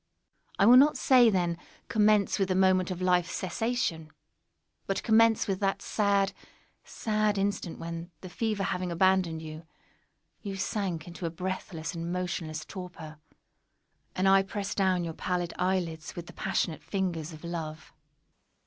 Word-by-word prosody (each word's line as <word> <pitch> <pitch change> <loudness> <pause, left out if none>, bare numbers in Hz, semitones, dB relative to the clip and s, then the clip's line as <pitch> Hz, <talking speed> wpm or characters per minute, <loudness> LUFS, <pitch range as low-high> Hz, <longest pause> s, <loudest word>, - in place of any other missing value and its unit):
I 195 - +4
will 245 +3 +9
not 290 +3 +6
say, 250 -4 +6
then, 175 -4 0 0.3
commence 210 -2 +3
with 195 - +2
the 185 - +1
moment 185 -1 +3
of 185 0 -4
life's 180 -2 +2
cessation—but 185 -2 -4
commence 225 0 +4
with 195 -2 -1
that 195 0 -1
sad, 200 -2 +1 0.5
sad 215 -2 0
instant 195 -3 -2
when, 165 +1 -6
the 185 - -8
fever 210 +1 -2
having 180 -2 -2
abandoned 175 -2 +2
you, 155 +1 -9 0.7
you 200 -2 -5
sank 185 -4 -2
into 170 0 -5
a - - -2
breathless 180 0 -5
and 170 0 -4
motionless 170 -4 -3
torpor, 175 -5 -9 1.0
and 185 +1 +1
I 195 0 +6
pressed 200 +1 -4
down 185 -3 +2
your 165 -1 -4
pallid 175 +1 -2
eyelids 175 -3 -1
with 175 - -6
the - - -12
passionate 160 - -1
fingers 175 -5 -3
of 155 0 -12
love. 160 -2 -6
185 Hz, 145 wpm, -29 LUFS, 170-200 Hz, 1.0 s, will